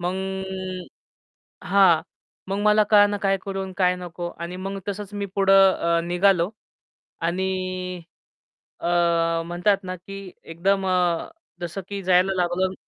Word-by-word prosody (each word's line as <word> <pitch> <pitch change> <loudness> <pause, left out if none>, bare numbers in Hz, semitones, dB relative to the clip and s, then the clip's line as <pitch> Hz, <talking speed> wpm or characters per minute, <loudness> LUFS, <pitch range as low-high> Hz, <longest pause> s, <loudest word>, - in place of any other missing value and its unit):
मग 180 +1 -1 1.5
हां. 180 -2 +5 0.5
मग 195 +1 -2
मला 210 0 +5
कळेना 205 0 +5
काय 195 0 +2
करू 195 -1 -3
आणि 190 -1 -8
काय 180 -1 +3
नको 175 -1 -6
आणि 170 +2 -5
मग 195 +1 -5
तसंच 205 0 -5
मी 205 0 -3
पुढं 195 -1 +6
अ, 170 0 +1
निघालो 175 +1 +2 0.7
आणि 185 +1 -2 0.8
अ, - - -3 0.6
म्हणतात 180 +4 +1
ना 185 0 -5
की 195 +1 -10
एकदम 190 +4 0
अ, 180 -2 +1 0.3
जसं 175 +3 -4
की 200 -1 -4
जायला 185 +1 +3
लागलो. 180 +1 0
185 Hz, 130 wpm, -24 LUFS, 175-195 Hz, 1.5 s, पुढं